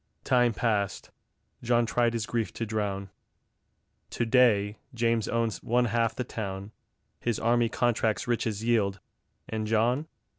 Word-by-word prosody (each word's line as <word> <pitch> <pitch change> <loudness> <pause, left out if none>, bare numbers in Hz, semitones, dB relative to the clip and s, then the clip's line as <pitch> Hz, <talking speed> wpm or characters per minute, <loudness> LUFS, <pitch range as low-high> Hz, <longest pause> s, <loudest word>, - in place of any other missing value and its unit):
Time 120 -2 +3
passed. 105 -3 -1 0.5
John 120 0 +2
tried 120 0 +1
his 115 -2 -1
grief 115 -1 -2
to 115 - -3
drown; 100 -3 -3 1.0
To 120 - -1
day 110 -4 +3 0.2
James 115 -1 +1
owns 115 -2 -1
one 120 +1 +2
half 115 0 +1
the 125 - -2
town; 100 -3 -5 0.5
His 120 -3 -1
army 120 0 +2
contracts 115 -2 0
riches 110 -3 -1
yield; 105 -5 +1 0.5
And 110 -1 -3
John? 120 +7 +1
115 Hz, 135 wpm, -28 LUFS, 105-120 Hz, 1.0 s, Time